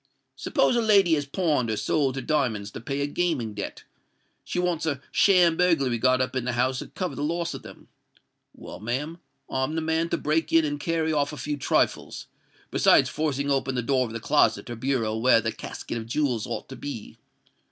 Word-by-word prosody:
Suppose - - +1
a 235 - +3
lady 200 -6 +4
has 145 -2 0
pawned 145 -6 0
or 110 - -1
sold 135 0 0
her 135 - -4
diamonds 120 -10 -1
to - - -8
pay 140 +4 -3
a - - +1
gaming 145 -8 -1
debt, 100 - -6 0.6
she - - -5
wants 175 -2 0
a 145 -4 -1
sham 180 -4 +5
burglary 140 -9 +2
got 130 +2 +3
up 130 - -2
in 130 - -1
the 125 0 -2
house 130 +2 +1
to - - -6
cover 185 -2 -4
the - - -5
loss 170 +2 -1
of 135 - -7
them: - - -13 0.7
well, - - -10
ma'am, 135 - -3 0.3
I'm 130 +4 -2
the 160 - 0
man 160 +1 0
to - - 0
break 155 +2 0
in 165 -1 +5
and 145 -1 -3
carry 160 0 0
off 145 -1 +1
a - - -7
few 145 +3 -3
trifles, 140 - 0 0.5
besides - - +4
forcing 140 -2 -1
open 135 -1 0
the 125 - -1
door 130 0 +1
of - - -9
the 115 - -4
closet 115 - +2
or - - -4
bureau 115 -3 -1
where 115 +1 +4
the 115 0 -2
casket 115 - -6
of 110 - -8
jewels 120 -3 -1
ought - - -5
to 135 - -7
be. 135 -7 -7
140 Hz, 210 wpm, -26 LUFS, 125-160 Hz, 0.7 s, sham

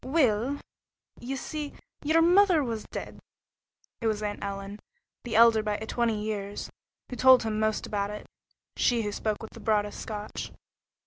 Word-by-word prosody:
"Weel, 260 -2 +2 0.6
ye 260 +3 -4
see, 295 +2 -5 0.3
ye'r 320 +2 +4
mither 355 -2 +5
was 230 -4 -3
dead." - - -7 0.8
It 230 - 0
was 215 -1 0
Aunt 205 -1 -3
Ellen, 200 +1 -5 0.4
the 235 -3 -4
elder 230 -1 +7
by 210 -1 -1
twenty 220 0 -1
years, 205 -1 -4 0.4
who - - -3
told 260 0 +7
him 215 -1 -1
most 215 0 0
about 200 -1 -2
it, 210 0 -7 0.5
she 235 -2 +2
who 205 - -2
spoke 215 +1 -2
with 220 - -8
the - - -12
broadest 210 -2 0
Scotch. 210 -1 -6
220 Hz, 155 wpm, -28 LUFS, 210-255 Hz, 0.8 s, elder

